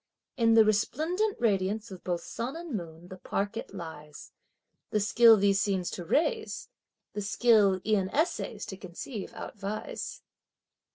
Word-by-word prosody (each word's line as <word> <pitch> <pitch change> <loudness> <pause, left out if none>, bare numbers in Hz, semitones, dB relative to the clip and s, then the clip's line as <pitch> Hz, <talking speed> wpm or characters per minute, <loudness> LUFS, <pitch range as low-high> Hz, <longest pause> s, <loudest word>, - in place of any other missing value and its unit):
In 230 -3 +4
the 225 -1 +7
resplendent 320 - +1
radiance 205 -1 0
of 185 -2 -9
both 175 -2 -2
sun 245 +5 -4
and 335 -6 -5
moon 170 -2 -7
the 185 - -8
park 200 +3 -2
it 230 - -6
lies! 160 -5 -9 0.6
The 210 - +1
skill 225 +2 +6
these 200 -1 +3
scenes 190 -3 0
to 180 - -5
raise 435 - 0 0.4
the 205 - -3
skill 205 -2 +4
e'en 200 -3 +2
essays 300 - -1
to 190 - -7
conceive 195 +4 -7
outvies! 210 - -6
205 Hz, 145 wpm, -29 LUFS, 190-235 Hz, 0.6 s, the